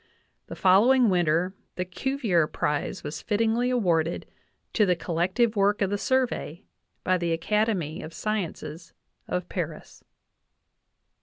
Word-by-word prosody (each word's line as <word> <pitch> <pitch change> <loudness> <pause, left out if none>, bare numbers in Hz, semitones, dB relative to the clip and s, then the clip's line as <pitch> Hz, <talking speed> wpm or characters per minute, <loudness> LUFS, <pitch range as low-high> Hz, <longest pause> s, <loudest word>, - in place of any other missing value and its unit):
The - - -7
following 220 +5 +5
winter 175 +1 +1 0.2
the 180 - -2
Cuvier 195 - 0
prize 150 -1 -2
was 150 +1 -5
fittingly 230 +3 +1
awarded 175 -9 +1 0.5
"to 215 - +3
the 180 - +3
collective 185 +8 0
work 205 +1 +2
of 195 - -1
the 205 - 0
Survey" 245 - -1 0.4
by 185 0 +2
the 170 -1 0
Academy 185 -3 0
of 160 - -8
Sciences 170 -5 -4 0.3
of 180 0 -2
Paris. 165 -4 -6
185 Hz, 125 wpm, -26 LUFS, 170-220 Hz, 0.5 s, following